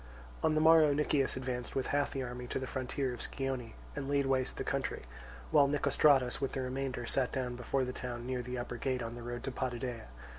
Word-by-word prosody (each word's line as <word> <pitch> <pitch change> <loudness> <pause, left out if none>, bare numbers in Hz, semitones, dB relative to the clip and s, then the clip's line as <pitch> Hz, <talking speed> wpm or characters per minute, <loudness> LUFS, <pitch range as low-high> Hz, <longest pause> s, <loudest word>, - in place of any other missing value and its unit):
On 155 -1 +3
the - - +4
morrow 160 -2 +7
Nicias 145 -3 +1
advanced 125 -2 -3
with 135 - 0
half 145 0 +2
the 135 -2 -3
army 125 0 -5
to - - -2
the 130 - -2
frontier 130 0 -2
of 120 - -7
Scione 130 -4 -3 0.2
and 140 -2 -3
laid 140 -1 +2
waste 130 -1 0
the - - -2
country; - - -2 0.5
while 140 - +6
Nicostratus 140 -2 +3
with 135 - -1
the 135 - -1
remainder 130 -1 -2
sat 125 +2 +1
down 125 -2 -2
before 130 +2 0
the 125 - -4
town 120 -2 -5
near 125 0 -1
the 125 +1 -5
upper 120 0 -4
gate 130 -1 -1
on 115 0 -4
the 120 - -8
road 120 0 -5
to 135 - -3
Potidæa. 125 -2 -3
130 Hz, 220 wpm, -33 LUFS, 125-135 Hz, 0.5 s, morrow